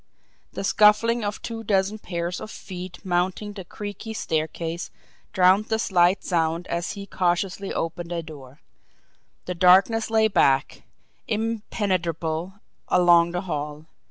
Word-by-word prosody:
The - - -4
scuffling 215 +3 +4
of 205 0 -4
two 225 -1 -5
dozen 200 0 +1
pairs 175 -2 -4
of - - -7
feet 185 -2 -9
mounting 185 +3 -1
the 195 -2 -8
creaky 205 +4 -7
staircase 165 0 -3 0.4
drowned 190 +3 +4
the 220 0 0
slight 185 -3 +2
sound 165 -1 0
as 170 0 -2
he 200 -1 -7
cautiously 185 +1 -1
opened 170 +1 -4
a 170 -1 -2
door; 145 -3 -12 0.8
the 180 - -3
darkness 190 +6 +4
lay 220 -1 +4
black, 135 -8 +2 0.5
impenetrable, 190 -6 -2 0.3
along 175 -1 +5
the 175 +1 -3
hall. 150 -4 -5
180 Hz, 130 wpm, -24 LUFS, 170-205 Hz, 0.8 s, along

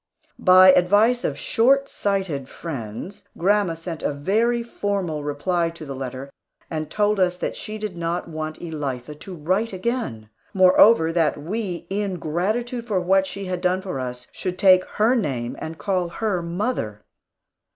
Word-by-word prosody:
By 185 0 +8
advice 205 +7 +4
of - - -1
short 275 +4 +3
sighted 190 - -2
friends, 140 - -7 0.2
grandma 195 -1 +2
sent 165 0 -6
a - - 0
very 220 +11 +1
formal 195 -9 -2
reply 165 +4 0
to 165 -1 -10
the 135 -1 -6
letter, 130 +1 -6 0.4
and 155 -2 -3
told 210 +2 +1
us 180 -1 +2
that - - -3
she 215 0 -6
did 210 -4 -5
not 170 +1 -2
want 155 -1 -5
Elitha 150 -5 -5
to 185 +3 -8
write 185 +8 -1
again. 185 - -3 0.2
Moreover, 185 -2 +6
that 165 -2 +2
we, 180 +3 -4
in 200 -1 -1
gratitude 220 +10 -2
for 200 -5 +1
what 190 +2 +2
she 195 0 -6
had 180 -1 -3
done 185 +1 +1
for 180 -9 -4
us, 125 -1 -5
should 185 -1 -4
take 185 -1 +6
her 220 +4 +4
name 135 - -1
and 160 0 -6
call 185 -3 -1
her 195 0 -1
"mother." 170 - -3
180 Hz, 160 wpm, -23 LUFS, 155-205 Hz, 0.4 s, By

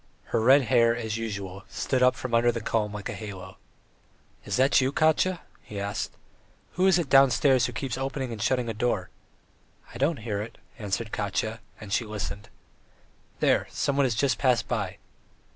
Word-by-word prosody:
Her - - +3
red 135 +5 +6
hair, 115 -2 +3
as 110 -2 -3
usual, 100 -4 -5
stood 130 -2 -1
up 125 0 +5
from 130 -2 -6
under 120 +1 +4
the 115 - -4
comb 110 -1 -1
like 105 -1 -6
a - - -4
halo. 100 -3 -8 0.9
"Is 100 - -2
that 135 +3 +4
you, 130 +1 +1
Katya?" 160 +4 +2 0.2
he 105 - -8
asked. 100 +1 -3 0.6
"Who 185 +1 +2
is 190 -2 +5
it 170 -4 -1
downstairs 135 -1 +5
who - - -6
keeps 130 +1 -4
opening 135 -1 -3
and 110 -3 -6
shutting 125 +3 +1
a 115 - -2
door?" 110 -4 -1 0.8
"I 120 - -8
don't 145 +3 +1
hear 105 -3 -2
it," 115 +2 -8 0.2
answered 105 +1 -3
Katya; 110 +2 -2 0.2
and 105 -3 -7
she 120 - +2
listened. 105 -1 -6 0.9
"There, - - +3
someone 140 -1 +1
has 120 - -1
just 130 +1 +1
passed 125 -4 +2
by." - - -2
115 Hz, 175 wpm, -27 LUFS, 105-135 Hz, 0.9 s, red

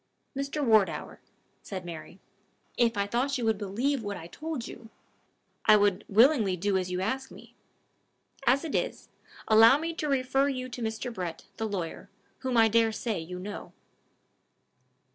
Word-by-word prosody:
"Mr. 275 +1 -2
Wardour," 200 -9 +2 0.4
said 185 -3 -7
Mary, 170 +2 -9 0.6
"if 230 -3 +2
I 200 - +1
thought 255 +6 0
you 240 - -2
would 220 -2 +1
believe 235 +7 -1
what 205 -2 -4
I 165 - -9
told 305 - -5
yon, 225 - -11 0.8
I 215 - +7
would 205 -1 +1
willingly 220 -3 +4
do 200 +2 0
as 185 -1 0
you 180 0 -2
ask 265 +7 -2
me. - - -14 0.9
As 265 +5 +4
it 310 - -5
is, - - -2 0.4
allow 225 +4 +7
me 330 +2 -3
to 310 -2 -3
refer 270 0 +2
you 255 -2 -3
to 245 - -7
Mr. 225 +2 -3
Brett, 175 -5 -5
the 225 - -2
lawyer, 180 -5 -5 0.3
whom 255 -2 -1
I 225 -1 +7
dare 225 0 +3
say 220 -2 -3
you 175 +3 -7
know." 205 +3 -7
225 Hz, 160 wpm, -28 LUFS, 195-260 Hz, 0.9 s, I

